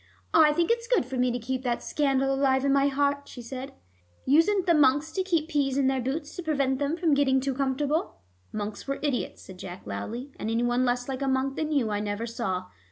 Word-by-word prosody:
"I 310 -2 +7
think 340 +6 +1
it's 470 0 0
good 485 - +2
for 260 +1 -6
me 250 0 +2
to 245 - -1
keep 255 +2 -3
that 245 -2 -2
scandal 270 -2 +1
alive 270 0 +2
in 275 - +3
my 280 0 +4
heart," 280 0 0
she 245 - -9
said. 260 +2 -6 0.5
"Usen't 355 +7 +4
the 345 - +4
monks 290 +1 +3
to 380 - -1
keep 335 -5 0
peas 280 -4 0
in 275 - +2
their 265 -1 +1
boots 290 +4 -4
to - - -4
prevent 275 -5 0
them 290 +3 -1
from 335 -4 +2
getting 275 -2 +3
too 270 +1 -1
comfortable?" 280 +4 -1 0.4
"Monks 210 +2 -5
were 275 - -1
idiots," 280 -5 -2
said 185 -1 -12
Jack 180 0 -8
loudly, 220 - -5
"and 220 - -3
any 230 +1 +1
one 245 +1 +2
less 245 0 0
like 265 0 -4
a 275 - 0
monk 265 +1 0
than 310 -1 -2
you, 260 -8 +1
I 205 - 0
never 205 +2 -3
saw. 210 -6 -3
270 Hz, 230 wpm, -27 LUFS, 245-295 Hz, 0.5 s, I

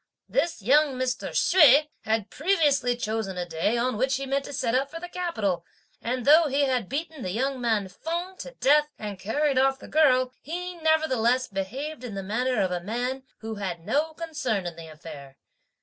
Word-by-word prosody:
This 330 - -1
young 285 +4 +4
Mr. 255 0 -2
Hsüeh 300 -4 +5 0.2
had 220 -2 -1
previously 285 -7 +2
chosen 215 -5 -3
a 180 - -2
day, 170 +7 0
on 245 -1 0
which 265 +4 +1
he 275 - -3
meant 275 +1 -1
to - - -7
set 255 -4 -1
out 270 +2 +1
for 330 +3 -7
the 355 - -7
capital, 220 - -2 0.4
and 245 +1 -2
though 310 +3 +7
he 280 +1 +1
had 255 -7 0
beaten 310 0 -4
the 185 - -3
young 255 +6 -1
man 220 -5 +1
Feng 340 - -4
to - - -7
death, 295 +2 +4
and 205 -3 -6
carried 275 +7 +1
off 270 0 +3
the - - -12
girl, 255 -5 +3
he 360 +4 -5
nevertheless 265 -7 +2
behaved 250 +9 -5
in 230 -5 -6
the 195 - -4
manner 245 +4 0
of 185 - -1
a 175 -1 -2
man 245 +7 -3 0.2
who 225 0 -5
had 190 -4 -3
had 165 - -22
no 310 - 0
concern 285 - -2
in 175 -2 -5
the 165 -1 -10
affair. 150 -4 -11
255 Hz, 195 wpm, -26 LUFS, 210-300 Hz, 0.4 s, though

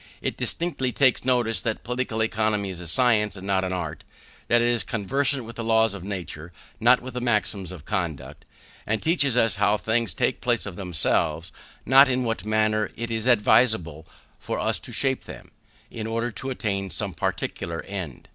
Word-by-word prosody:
It - - -3
distinctly 160 -7 -2
takes 130 0 +3
notice 120 -3 +1
that 110 -2 -3
Political 125 -2 -1
Economy 110 -2 0
is 90 - -8
a 90 - -7
science 105 +3 +3
and 95 -1 -8
not 95 -1 +1
an 95 - -2
art; 80 -4 -4 0.4
that 120 - +4
it 120 - +2
is 120 -1 +1
conversant 135 +3 -1
with 115 +1 -10
laws 110 -1 +3
of 100 -3 -8
nature, 90 -4 -6 0.3
not 120 +3 +5
with 125 -1 -6
maxims 105 -5 0
of 85 -5 -10
conduct, 85 -8 -4 0.4
and 110 +1 0
teaches 145 -6 +2
us 115 -5 +3
how 105 +1 +3
things 110 -3 -1
take - - 0
place - - +1
of - - -6
themselves, 85 -3 0 0.3
not 135 +1 +7
in 130 0 +1
what 115 -3 -2
manner 110 -1 +1
it 120 0 -4
is 115 +1 -2
advisable 105 -9 +3 0.3
for - - -4
us - - 0
to - - -9
shape 135 -1 0
them, - - -11 0.4
in 110 -1 -5
order 115 +2 -2
to 130 +6 -5
attain 100 -6 -2
some 100 -1 -1
particular 85 +1 -3
end. 90 -9 -7
110 Hz, 180 wpm, -25 LUFS, 95-120 Hz, 0.4 s, not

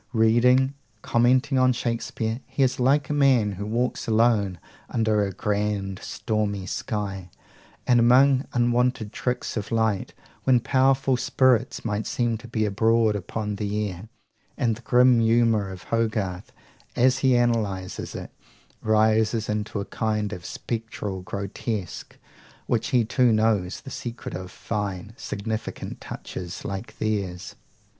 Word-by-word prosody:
Reading, 125 +4 +4 0.3
commenting 130 +3 +3
on 130 0 +4
Shakespeare, 115 -1 -2
he 140 - 0
is 130 0 +1
like 140 +3 +2
a - - +1
man 130 -7 +3
who 100 +2 -5
walks 120 +3 -1
alone 110 -4 +2 0.3
under 110 -2 +1
a 100 - -2
grand 100 -1 -2
stormy 105 -3 -2
sky, 95 -2 -4 0.6
and 120 -1 +4
among 130 +3 +5
unwonted 120 -2 +1
tricks 125 0 -2
of 105 +1 -4
light, 110 -4 0 0.3
when 130 -2 +4
powerful 135 +1 +2
spirits 125 -2 +2
might 105 -1 -2
seem 120 -2 0
to 120 - -11
be 110 -2 0
abroad 110 +1 +2
upon 105 +1 -4
the 105 0 -2
air; 90 +5 -10 0.5
and 120 -5 +1
the 120 - -13
grim 125 0 +5
humour 115 -3 +3
of 95 -1 -9
Hogarth, 105 -5 -2 0.4
as 130 +2 +3
he 130 -2 +3
analyses 110 -6 -1
it, - - -7 0.5
rises 110 +1 +2
into 105 0 -2
a 100 - -3
kind 105 -2 -2
of 90 -4 -8
spectral 110 -4 -4
grotesque; 100 +1 -5 0.5
while 115 - +1
he 120 0 +1
too 120 +2 +3
knows 110 -4 +1
the 135 - -10
secret 120 -1 -6
of 90 0 -6
fine, 105 -1 -4
significant 110 -4 -5
touches 90 -1 -7
like 100 +4 -6
theirs. 100 -5 -2
110 Hz, 135 wpm, -25 LUFS, 105-120 Hz, 0.6 s, among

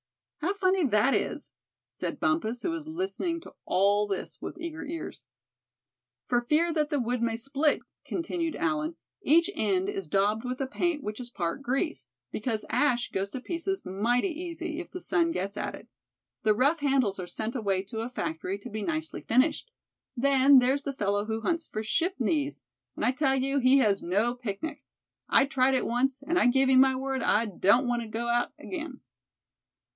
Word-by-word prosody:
"How 370 +6 -1
funny 375 -2 +2
that 220 +2 +3
is," - - -2 0.4
said - - -4
Bumpus, 245 -7 0
who 350 - 0
was 320 -2 -5
listening 340 0 -2
to - - -13
all 205 +2 +3
this 195 -2 -5
with - - -6
eager 330 -1 -5
ears. 320 - -6 1.0
"For 245 -1 +2
fear 315 +7 +2
that 305 -2 +1
the 295 -2 0
wood 245 0 -1
may 230 -1 0
split," 275 +5 +1 0.2
continued 335 -1 -2
Allan, 315 0 -1 0.3
"each 335 +2 +4
end 195 - 0
is 195 -4 -4
daubed 205 +6 +1
with 250 0 -4
a 270 - 0
paint 295 +3 -1
which 210 +2 -5
is 245 -1 -6
part 175 +2 -3
grease; 250 - -2 0.2
because 220 0 -2
ash 250 -5 +2
goes 195 +1 -2
to 255 - -5
pieces 350 +6 -3
mighty 235 - +1
easy, 335 -1 -5
if 350 - -7
the 365 - -7
sun 335 -1 +2
gets 200 - -3
at - - -3
it. - - -14 0.5
The 215 -1 +3
rough 285 +8 +3
handles 265 -9 +1
are 180 - -4
sent 220 +6 -4
away 195 -5 0
to 220 +3 -5
a 230 - -4
factory 170 -3 -3
to 245 - -9
be 215 +1 -4
nicely 320 +6 -3
finished. 270 - +1 0.5
Then 275 +1 +6
there's 260 +3 +3
the 280 - -3
fellow 205 -4 0
who 220 0 -3
hunts 330 +6 -1
for 215 - -4
ship 345 - 0
knees; 295 - 0 0.3
and - - -1
I - - +4
tell 270 0 +2
you 275 +1 +1
he 260 +1 +5
has 210 -7 +3
no 210 +7 +1
picnic. 250 +6 -5 0.5
I 270 - +5
tried 265 -1 +2
it 255 - +1
once, 260 +3 0
and 335 +5 +1
I 245 - +4
give 265 +2 +4
you 260 -1 +6
my 265 0 +5
word 265 0 -2
I 220 +3 +3
don't 210 +5 +3
want 240 -1 0
to 230 - -6
go 225 +2 -3
out 240 0 +1
again." 315 -7 -6
260 Hz, 190 wpm, -28 LUFS, 220-315 Hz, 1.0 s, Then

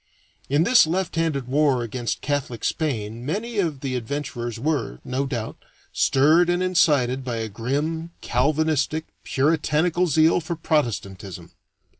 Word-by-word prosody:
In 145 +4 +3
this 240 -2 +6
left 180 +2 -1
handed 155 -6 -1
war 135 -2 +2
against 120 +1 -3
Catholic 140 -5 -2
Spain 115 -7 -2
many 210 - -3
of 155 -8 -1
the 130 -2 -2
adventurers 120 -2 -4
were, 135 - -1
no 130 +2 -2
doubt, 120 -5 -4 0.4
stirred 155 +6 +4
and 175 +1 +1
incited 140 -8 +2
by 125 -2 -3
a 115 -1 -3
grim, 145 +10 -2
Calvinistic, 155 +3 0 0.2
puritanical 160 +4 +1
zeal 160 +2 +4
for 170 +1 -4
Protestantism. 105 - -2
145 Hz, 130 wpm, -23 LUFS, 125-160 Hz, 0.4 s, this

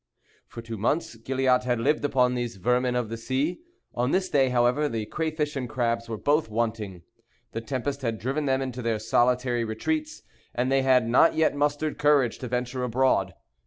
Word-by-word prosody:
For 115 - -9
two 115 -2 -6
months 130 +5 0
Gilliatt 130 +2 +1
had 120 -2 0
lived 145 +6 +1
upon 125 -3 +2
these 120 -1 -3
vermin 125 +6 +1
of 120 -3 -1
the 115 - -4
sea. 130 +8 -1 0.3
On 125 +1 0
this 185 +4 +1
day, 135 -3 +3
however, 125 +4 +2
the 115 -2 -3
crayfish 155 +2 -2
and 125 -3 -3
crabs 115 -2 -1
were 110 - -3
both 145 +4 +1
wanting. 110 -5 -3 0.5
The 115 - -4
tempest 135 +3 -3
had 115 -3 -2
driven 135 +8 -2
them 135 0 +1
into 130 -1 -5
their 115 -2 0
solitary 120 +2 +1
retreats; 310 - -3 0.3
and 125 +2 0
they 135 0 +3
had 130 -3 +3
not 125 +8 +4
yet 155 -2 +2
mustered 145 +1 -1
courage 145 -5 +3
to 125 - -5
venture 125 +1 -2
abroad. 130 +2 +1
125 Hz, 185 wpm, -26 LUFS, 115-140 Hz, 0.5 s, not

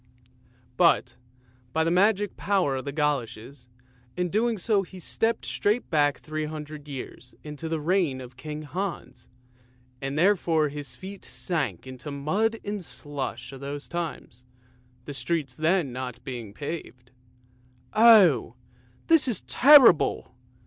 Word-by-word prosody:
But, 120 - +3 0.6
by 160 - +2
the 165 - 0
magic 200 +2 +2
power 185 -9 0
of 130 - -6
the 140 - -3
goloshes, 135 -4 -3 0.5
in 180 0 0
doing 225 +4 +1
so 205 +2 +1
he 190 0 -11
stepped 225 +5 -1
straight 215 +2 -1
back 145 -2 +2
three 155 0 -4
hundred 150 -1 -8
years 130 -2 -9
into 150 +2 -7
the 160 -1 -1
reign 165 -4 +1
of 125 -1 -10
King 150 +3 -7
Hans, 170 -6 -6 0.7
and 135 +1 -3
therefore 165 -4 +2
his 145 -3 -5
feet 195 +6 -10
sank 165 -7 -2
into 130 +1 -10
the 145 - -5
mud 200 +11 0
and 205 -2 -4
slush 140 -5 -6
of 135 - -10
those 140 +1 -6
times, 155 -7 -6 0.6
the 145 - -6
streets 135 0 -2
then 155 -3 +1
not 125 -1 -6
being 120 -7 -6
paved. 135 -5 -7 0.8
"Oh! 200 - +6 0.5
this 325 -4 +5
is 230 -7 0
terrible!" 280 -1 +6
155 Hz, 135 wpm, -26 LUFS, 135-190 Hz, 0.8 s, Oh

